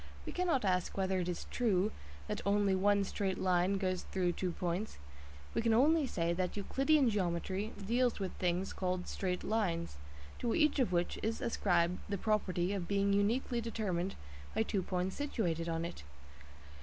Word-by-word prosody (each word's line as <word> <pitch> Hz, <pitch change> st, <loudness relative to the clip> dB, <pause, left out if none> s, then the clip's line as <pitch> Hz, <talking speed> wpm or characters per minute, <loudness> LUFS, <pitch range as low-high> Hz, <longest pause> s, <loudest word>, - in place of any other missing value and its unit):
We -, -, -4 dB
cannot 340 Hz, -, +1 dB
ask 180 Hz, -1 st, 0 dB
whether 190 Hz, -1 st, +1 dB
it 180 Hz, 0 st, -1 dB
is 175 Hz, -, -4 dB
true 210 Hz, -4 st, +2 dB, 0.4 s
that -, -, -3 dB
only 200 Hz, -1 st, +3 dB
one 200 Hz, +1 st, +3 dB
straight 195 Hz, -1 st, -2 dB
line 185 Hz, +1 st, +2 dB
goes 185 Hz, -2 st, -1 dB
through 180 Hz, -2 st, 0 dB
two 180 Hz, +1 st, -2 dB
points. 180 Hz, +4 st, -3 dB, 0.6 s
We -, -, +1 dB
can 225 Hz, -1 st, +3 dB
only 295 Hz, +4 st, +4 dB
say 170 Hz, -6 st, 0 dB
that 180 Hz, +3 st, -2 dB
Euclidean 270 Hz, +7 st, +3 dB
geometry 190 Hz, +2 st, -1 dB
deals 240 Hz, +2 st, +2 dB
with 190 Hz, -2 st, -2 dB
things 180 Hz, +1 st, 0 dB
called 180 Hz, -1 st, -2 dB
"straight 180 Hz, -2 st, -2 dB
lines," 170 Hz, -, -1 dB, 0.4 s
to 235 Hz, -, 0 dB
each 305 Hz, -2 st, +3 dB
of 255 Hz, -, +2 dB
which 175 Hz, 0 st, 0 dB
is 225 Hz, +1 st, -1 dB
ascribed 180 Hz, -5 st, +1 dB
the 200 Hz, -, -1 dB
property 190 Hz, -3 st, 0 dB
of 185 Hz, -4 st, -3 dB
being 200 Hz, 0 st, +2 dB
uniquely 235 Hz, +4 st, +1 dB
determined 195 Hz, -5 st, -2 dB, 0.4 s
by 220 Hz, -, +3 dB
two 205 Hz, -3 st, -1 dB
points 185 Hz, +1 st, -2 dB
situated 175 Hz, -, -1 dB
on 165 Hz, 0 st, -1 dB
it. 170 Hz, -, -6 dB
195 Hz, 170 wpm, -34 LUFS, 180-220 Hz, 0.6 s, only